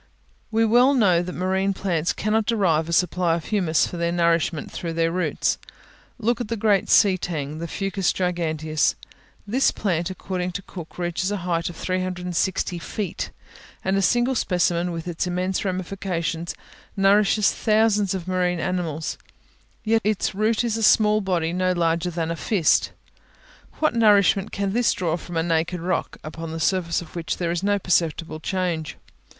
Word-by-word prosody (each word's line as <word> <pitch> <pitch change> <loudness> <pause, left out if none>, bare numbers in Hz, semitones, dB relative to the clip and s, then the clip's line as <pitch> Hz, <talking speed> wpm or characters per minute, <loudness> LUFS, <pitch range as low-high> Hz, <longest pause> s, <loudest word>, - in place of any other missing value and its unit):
We 225 0 +2
well 245 +5 +5
know 185 -8 +4
that 180 0 -5
marine 190 +2 0
plants 170 -4 0
cannot 215 +1 0
derive 170 -8 +1
a - - -3
supply 175 0 +2
of 165 - -5
humus 180 -7 +2
for 175 - -6
their 170 0 0
nourishment 170 -2 +1
through 170 -2 -4
their 165 0 +1
roots. 180 +1 0 0.6
Look 240 +1 0
at 240 - -3
the 230 +1 -3
great 205 -2 +2
sea 195 -3 +5
tang, 155 -3 -4
the 170 - -4
Fucus 195 +1 -1
giganteus: 160 -4 0 0.5
this 245 +6 +2
plant, 175 -4 -1
according 185 -1 -4
to 200 - -5
Cook, 175 -4 -10
reaches 175 +1 -1
a 205 - -1
height 170 -1 0
of 175 - -9
360 180 0 -2
feet, 195 +1 -4 0.6
and 190 - +1
a 195 - +2
single 240 +7 +2
specimen, 180 -5 +1
with 165 0 -5
its 175 +1 -2
immense 180 +1 -1
ramifications, 180 -3 -3 0.4
nourishes 200 +1 +4
thousands 215 -3 +2
of 185 -2 -6
marine 180 -1 0
animals, 170 -4 -3 0.6
yet 225 0 +2
its 210 -1 0
root 215 +3 +1
is 230 -2 -1
a - - -3
small 215 0 +4
body, 175 -4 -1
no 185 0 +1
larger 170 0 0
than 165 -1 -3
the 170 - -2
fist. 175 0 +2 0.9
What 310 - +1
nourishment 205 -4 +4
can 200 -1 -2
this 240 0 +3
draw 170 -3 -1
from 175 0 -6
a 165 - +2
naked 170 +1 0
rock, 180 +2 -2
upon 160 +1 -7
the 165 - -4
surface 175 0 0
of 165 - -15
which 165 -3 -3
there 170 -2 -1
is 175 0 -1
no 205 +1 +2
perceptible 165 -3 0
change? 170 -3 -2
180 Hz, 165 wpm, -23 LUFS, 170-200 Hz, 0.9 s, well